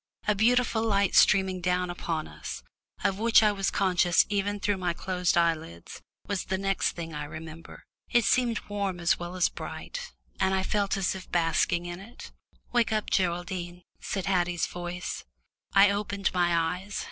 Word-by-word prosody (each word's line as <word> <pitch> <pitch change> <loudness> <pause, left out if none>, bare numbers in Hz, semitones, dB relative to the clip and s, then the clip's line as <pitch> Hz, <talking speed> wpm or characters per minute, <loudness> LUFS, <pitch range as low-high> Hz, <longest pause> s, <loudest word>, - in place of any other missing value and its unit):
A 210 - +4
beautiful 230 +2 +2
light 200 -3 +2
streaming 190 -2 +4
down 180 0 0
upon 165 -3 -3
us, 75 - -7 0.4
of 195 0 +1
which 225 0 +5
I 210 - +5
was 195 -1 -1
conscious 180 -3 +3
even 205 0 -1
through 205 0 0
my 180 -2 -1
closed 180 0 0
eyelids, 160 - -1 0.2
was 200 -2 -2
the 190 - -1
next 195 0 0
thing 165 -2 -6
I 150 0 -4
remember. 160 +2 -10 0.3
It 240 -2 +3
seemed 240 -1 +2
warm 200 -3 -2
as 170 0 +2
well 175 +1 -6
as 180 - +3
bright, - - -7 0.3
and 190 0 +2
I 190 - 0
felt 200 0 0
as 190 -2 0
if 190 -1 -10
basking 170 +1 +1
in 175 0 -6
it. 225 +5 -11 0.4
"Wake 240 -1 +2
up, 215 -1 -1
Geraldine," 175 -1 -1 0.2
said 195 -2 -3
Haddie's 180 -3 +1
voice. 175 0 -5 0.5
I 200 +1 +7
opened 200 -1 -2
my 175 -1 +1
eyes. 195 +2 -6
185 Hz, 170 wpm, -28 LUFS, 175-200 Hz, 0.5 s, I